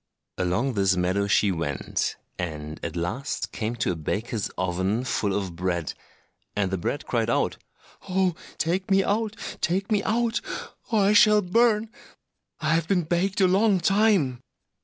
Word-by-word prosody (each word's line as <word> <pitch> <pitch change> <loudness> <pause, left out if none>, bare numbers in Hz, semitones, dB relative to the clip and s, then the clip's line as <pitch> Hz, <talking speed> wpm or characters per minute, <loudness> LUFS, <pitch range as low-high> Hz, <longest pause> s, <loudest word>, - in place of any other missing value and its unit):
Along 95 +9 0
this 95 -3 +2
meadow 95 +3 +1
she 100 0 +3
went, 80 -5 -2 0.2
and 75 -3 -5
at 80 0 -4
last 90 +11 -3
came 115 +1 -3
to 110 - 0
a - - -2
baker's 105 +6 -3
oven 95 +5 0
full 110 -5 0
of 95 -4 -3
bread, 85 -2 -2 0.6
and 95 -2 0
the 95 - 0
bread - - -2
cried - - 0
out, - - +1 0.5
"Oh, 185 -1 +2 0.2
take 185 +4 -1
me 195 0 +4
out! 215 +2 0 0.3
take 195 +5 0
me 210 -2 +3
out! 230 +2 0 0.5
or 220 -2 +3
I 200 +2 +4
shall 210 0 +6
burn; 220 +3 +2 0.7
I 155 0 +1
have 165 -1 +1
been 180 -2 +2
baked 180 +5 0
a 190 - +6
long 195 +1 +3
time!" 195 - +2
135 Hz, 160 wpm, -25 LUFS, -, 0.7 s, shall